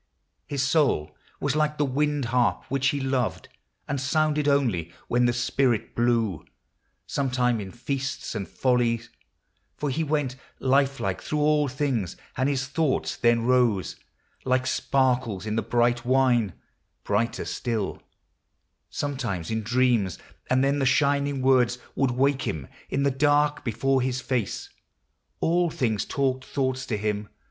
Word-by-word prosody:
His 140 -3 -1
soul 135 - +1 0.2
was 145 0 0
like 150 0 +1
the 145 - +2
wind 145 +1 0
harp, 125 -2 +2
which 135 0 +1
he 140 +2 +1
loved, 130 -3 -1 0.4
And 140 -2 -2
sounded 150 +1 +1
only 115 - +1 0.2
when 120 +1 +2
the - - +3
spirit 120 -1 0
blew, 115 - +1 0.6
Sometime 125 -4 0
in 95 - -6
feasts 135 +4 -4
and 100 -4 -4
follies, 120 -2 0 0.7
for 145 -2 -1
he 160 +5 0
went 145 -4 -1 0.2
Lifelike 135 -7 +1
through 150 -1 -2
all 150 -1 +3
things; 130 - -2 0.2
and 130 +1 +1
his 130 -2 0
thoughts 145 +1 0
then 120 -1 +2
rose 120 -8 +2 0.5
Like 130 0 +1
sparkles 130 -7 +1
in 110 0 -2
the 115 - +1
bright 120 +2 +1
wine, 125 -6 +3 0.5
brighter 115 +4 0
still; 115 -5 -3 0.9
Sometimes 120 - -3
in 110 0 0
dreams, 120 -5 +1 0.3
and 130 +1 +3
then 140 +1 +2
the 135 - +1
shining 140 0 +2
words 125 -2 +4 0.2
Would 135 -1 +1
Avake 135 +2 +1
him 75 - -3 0.2
in 140 - 0
the 140 - +3
dark 145 +2 +2
before 135 +2 +1
his 130 0 -1
face. 125 -5 -2 0.7
All 175 +1 +2
things 110 -8 -1
talked 130 -2 -1
thoughts. 130 -2 -2
to 110 - -1
him. 105 0 -2
130 Hz, 140 wpm, -26 LUFS, 115-140 Hz, 0.9 s, words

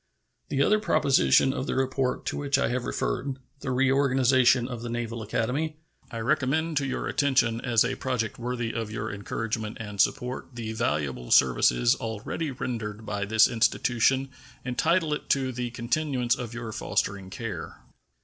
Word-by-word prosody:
The 140 0 +2
other 215 +7 +3
proposition 135 - +3
of 135 - -3
the - - -1
report 130 0 0
to - - -2
which 140 -1 +1
I - - +1
have 125 0 -2
referred 135 -1 -2 0.2
the 135 - -5
reorganization 130 -1 +3
of 120 -3 -6
the 120 - -5
Naval 115 -1 -3
Academy 135 +8 -1 0.3
I 115 - -5
recommend 155 +5 +1
to 140 -1 +1
your 130 - -3
attention 130 -5 +2
as 120 -3 +3
a - - -1
project 125 -5 -2
worthy 120 -1 -3
of 115 -2 -3
your 110 -1 -4
encouragement 110 +2 -4
and 105 -3 -1
support. 125 0 -1
The 110 -2 -4
valuable 75 - -2
services - - +4
already 115 +8 -4
rendered 115 -4 -5
by 100 -1 -2
this 110 +2 +5
institution 125 +3 +2 0.4
entitle 155 +6 +1
it 150 - -5
to 135 -2 +1
the 125 -1 -3
continuance 120 +1 0
of 120 -3 -4
your 115 -2 -5
fostering 100 -2 -2
care. 95 -6 -6
120 Hz, 160 wpm, -27 LUFS, 110-135 Hz, 0.4 s, this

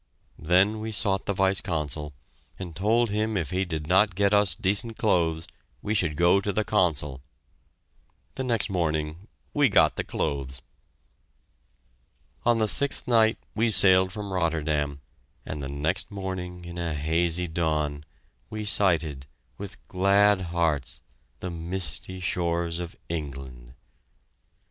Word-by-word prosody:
Then 95 +6 +3
we 110 +1 -4
sought 100 -2 +1
the 100 - +1
Vice 95 0 +2
Consul 75 -4 -3 0.5
and 90 -4 -7
told 110 +5 +2
him 110 0 0
if 85 -3 -3
he 95 +1 0
did 80 -4 -4
not 95 +3 +3
get 100 +1 +2
us 100 -5 +3
decent 105 +5 0
clothes, 85 -6 +1 0.4
we 105 - -1
should 90 -8 +1
go 90 +4 +4
to 100 - -1
the 110 +2 0
Consul. 75 -10 0 1.1
The 130 - -4
next 120 -4 +1
morning 80 -1 -2 0.3
we 145 -3 +4
got 80 -7 +4
the - - -1
clothes! 65 -2 -3 1.9
On 120 -1 +5
the 110 -1 +2
sixth 140 +5 +2
night 110 -2 +4 0.2
we 115 +1 +1
sailed 95 -3 +5
from 100 -1 -6
Rotterdam, 75 -5 -1 0.4
and 75 - -5
the 70 - -5
next 75 +7 -2
morning, 95 -3 -6
in 85 0 -7
a 85 -3 -2
hazy 85 +4 +1
dawn, 75 -3 -1 0.5
we 110 -1 -5
sighted, 80 -9 +2 0.3
with - - -9
glad 100 +1 +3
hearts, 80 -5 -1 0.4
the 90 - -4
misty 85 +1 -5
shores 85 -1 -1
of 85 -1 -6
England. 65 -6 -7
90 Hz, 135 wpm, -26 LUFS, 80-100 Hz, 1.9 s, On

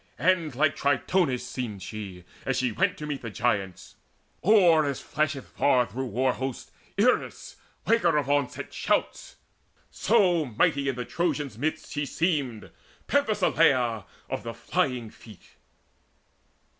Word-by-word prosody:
And 165 -1 +1
like 145 +2 +2
Tritonis 140 -1 +1
seemed 110 -7 -5
she, 95 -3 -7 0.2
as 135 -2 -1
she 130 -2 +1
went - - 0
To 150 - -6
meet 145 -2 -4
the 115 - -5
Giants, 100 -5 -2 0.4
or 175 -6 +5
as 140 -3 -2
flasheth 150 -3 -2
far 125 -3 +2
Through 130 +4 -5
war 125 +3 +1
hosts 130 0 -5 0.3
Eris, - - 0 0.3
waker 180 -9 +3
of 145 -3 0
onset 145 -2 -1
shouts. - - -1 0.6
So 190 -6 +3
mighty 140 +2 +1
in 135 - -2
the 125 0 -4
Trojans' 150 -7 -2
midst 155 +3 -2
she 145 -1 -2
seemed, 145 - -1 0.4
Penthesileia 165 - +2 0.2
of - - -3
the 115 -1 -6
flying 125 -3 -1
feet. 110 -4 -16
140 Hz, 130 wpm, -27 LUFS, 120-160 Hz, 0.6 s, or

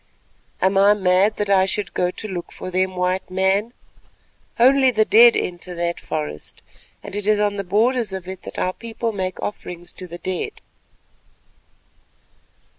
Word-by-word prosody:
"Am 190 +1 +3
I 205 +1 +6
mad 190 +2 +3
that 205 -1 -1
I 190 -1 +4
should 205 +1 -3
go 180 - +1
to 215 - -6
look 180 -4 -6
for 185 - -7
them, 185 +1 0
White 180 +1 -1
Man? 190 +4 +1 0.9
Only 265 +2 +6
the 215 -3 +2
dead 235 +2 +7
enter 180 0 -4
that 170 0 -2
forest, 75 0 -6 0.4
and - - -7
it 205 0 -3
is 215 -1 +3
on 205 -1 0
the 200 - -2
borders 220 +4 +1
of 190 -2 -6
it 190 -1 -7
that - - -10
our 185 - 0
people 230 +1 -4
make 185 -3 -4
offerings 175 -4 -6
to 185 - -8
the 175 0 -8
dead." 185 - -3
190 Hz, 165 wpm, -21 LUFS, 180-210 Hz, 0.9 s, dead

